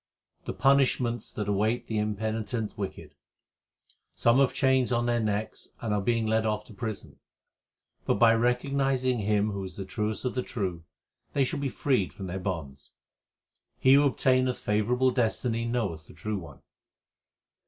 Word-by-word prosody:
The - - -3
punishments 130 -4 +2
that 105 -2 -4
await 105 +4 +1
the 110 -1 -2
impenitent 110 +1 -2
wicked: 90 -6 -6 1.0
Some 120 +3 +4
have 135 -2 +4
chains 130 -2 +2
on 120 -1 +1
their 120 0 +1
necks 110 -1 -2
and 110 -3 -2
are 105 - +1
being 115 +2 +1
led 110 0 +2
off 105 -1 -1
to 110 - -13
prison; 110 0 -6 0.9
But - - +3
by 115 +2 +6
recognizing 130 +1 +1
Him 105 0 +1
who 100 -1 -4
is 95 -2 -7
the 95 - -5
truest 105 +2 -2
of 125 - -1
the 125 - -1
true, 90 -9 -4 0.5
they 140 - +3
shall 130 - -2
be 140 -1 -1
freed 125 -4 0
from 95 - -7
their 95 +1 -4
bonds. 80 -7 -5 0.8
He 130 - +5
who 140 +1 +6
obtaineth 130 -1 +2
favourable 120 +5 +1
destiny 115 -1 0
knoweth 100 -10 -2
the - - -15
True 105 -2 -3
One. 80 - -12
110 Hz, 160 wpm, -28 LUFS, 105-125 Hz, 1.0 s, by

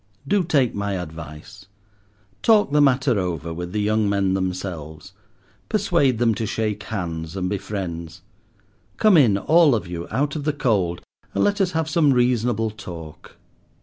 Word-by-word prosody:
Do 200 +2 +2
take 140 -8 +2
my 100 0 -2
advice. 85 +2 -8 0.7
Talk 215 -9 +4
the 150 0 +4
matter 130 -4 +3
over 85 -3 -3
with 90 +1 -6
the 105 +2 -1
young 105 0 +1
men 100 -2 +1
themselves. 90 -5 -4 0.6
Persuade 170 - +2
them 115 -1 +2
to 110 +1 -3
shake 105 -1 -2
hands 85 -5 -4
and 90 -1 -2
be 100 +1 -2
friends. 90 -4 -6 0.7
Come 215 -3 +5
in, 120 -11 +5
all 155 - +4
of 110 - -3
you, 85 -1 -6
out 140 +5 -1
of 150 - -3
the 150 0 0
cold, 100 -11 0 0.3
and - - +2
let 205 0 +1
us 185 -1 +1
have 160 -1 0
some 155 -3 +3
reasonable 120 -3 +1
talk. 85 -7 -10
105 Hz, 160 wpm, -22 LUFS, 90-140 Hz, 0.7 s, Come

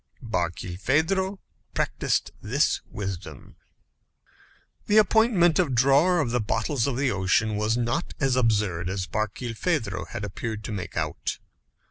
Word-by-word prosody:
Barkilphedro 125 - 0 0.4
practised - - 0
this - - +1
wisdom. 95 -4 -7 1.3
The 210 - +4
appointment 210 -5 +4
of 150 -8 +1
drawer 140 +8 +4
of 120 - -1
the 125 - +1
bottles 125 +4 0
of 130 -3 -1
the 135 -1 +1
ocean 100 +2 +1
was 105 +2 +1
not 120 +7 -1
as 135 -3 +2
absurd 105 -8 +1
as 95 -1 -2
Barkilphedro 110 - -2
had 100 - -5
appeared 110 +2 -5
to - - -5
make 90 -5 -5
out. - - -2
115 Hz, 125 wpm, -26 LUFS, 100-155 Hz, 1.3 s, The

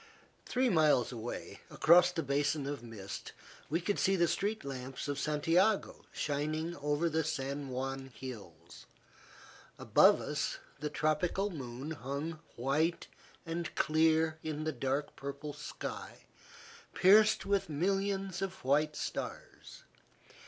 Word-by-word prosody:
Three 255 +1 +2
miles 155 - +4
away, 120 -1 -6
across 175 +2 +6
the 165 -2 -2
basin 145 +1 0
of 140 -1 -4
mist, 110 -5 -8 0.4
we 160 +4 +1
could 200 +3 -1
see 195 - +3
the 170 -2 +3
street 205 +1 -1
lamps 130 0 -5
of 145 -1 -2
Santiago 165 +8 +1
shining 155 +3 -2
over 145 +3 0
the 160 0 +1
San 140 -2 -3
Juan 135 +1 -3
hills. 110 -9 -10 0.9
Above - - +5
us, - - -2 0.2
the 150 +1 -2
tropical 160 +7 0
moon 135 -1 -6
hung 145 +3 -4 0.2
white 150 +7 0 0.4
and 165 0 -4
clear 160 0 +3
in 155 -1 -3
the 155 - 0
dark 140 0 -2
purple 140 +2 -6
sky, - - -7 0.7
pierced 210 +3 +6
with 200 -4 +1
millions 195 +3 -1
of 190 -7 -4
white 150 +3 +2
stars. - - -6
155 Hz, 125 wpm, -33 LUFS, 140-170 Hz, 0.9 s, across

